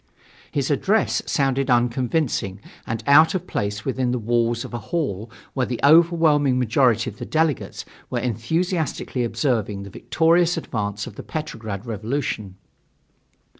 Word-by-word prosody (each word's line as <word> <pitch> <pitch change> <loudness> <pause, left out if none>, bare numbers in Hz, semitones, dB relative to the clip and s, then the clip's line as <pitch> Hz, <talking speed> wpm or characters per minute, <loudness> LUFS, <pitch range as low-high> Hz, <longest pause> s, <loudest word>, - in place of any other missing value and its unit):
His - - -1
address - - +1
sounded 135 0 +1
unconvincing 120 - 0 0.3
and 110 -1 -3
out 155 +6 +6
of 185 - -2
place 100 +1 -3
within 130 -1 0
the 125 - 0
walls 115 +1 0
of - - -10
a 120 - -3
hall 120 - -2 0.2
where 130 -2 0
the 120 - -3
overwhelming 155 -3 +5
majority 125 0 +2
of 105 -4 -7
the - - -5
delegates 160 -3 -1 0.2
were - - -2
enthusiastically 140 - -1
observing 110 -5 -1
the 100 - -10
victorious 170 - +2
advance 105 -8 -3
of - - -10
the - - -7
Petrograd 110 -9 -5
revolution. 110 -3 -3
125 Hz, 135 wpm, -23 LUFS, 110-155 Hz, 0.3 s, out